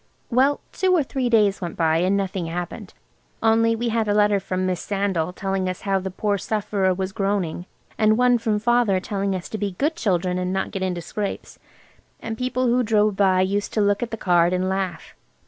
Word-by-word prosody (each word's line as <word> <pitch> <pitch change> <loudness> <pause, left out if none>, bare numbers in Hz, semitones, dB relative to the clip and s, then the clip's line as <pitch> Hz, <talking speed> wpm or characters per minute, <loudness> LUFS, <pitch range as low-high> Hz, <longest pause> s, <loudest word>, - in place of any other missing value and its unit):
Well, 270 +4 +3
two 370 -1 +2
or 320 - +3
three 260 -2 -2
days 210 -4 +3
went 175 -2 -5
by, 160 -1 +2
and 185 +4 +2
nothing 190 -3 -2
happened, 175 +1 -6 0.5
only 225 0 +3
we 235 +1 -2
had 225 -1 0
a 205 - +1
letter 205 -1 +3
from 185 0 -2
Miss 185 -2 -1
Sandal, 195 -5 -1
telling 190 0 -2
us 185 - -5
how 195 -1 0
the 190 0 -4
poor 200 +2 -1
sufferer 200 -2 0
was 190 +1 -2
groaning, 195 -4 -2 0.3
and 215 0 +4
one 245 -1 +4
from 220 -2 0
Father 230 -3 +2
telling 195 0 -2
us 180 - -5
to 215 - -5
be 200 -2 -2
good 300 - -1
children, 180 - 0
and 180 0 -2
not 190 0 -2
get 195 - -4
into 180 -2 -2
scrapes. 205 +3 -5 0.6
And 225 - -5
people 255 +2 -1
who 245 +1 +3
drove 215 -3 +2
by 190 -2 +3
used 200 +2 -1
to 215 - +1
look 205 0 +2
at 240 - -2
the 225 - -5
card 175 -3 +3
and 185 +1 0
laugh. 190 -4 -3
200 Hz, 210 wpm, -23 LUFS, 185-225 Hz, 0.6 s, and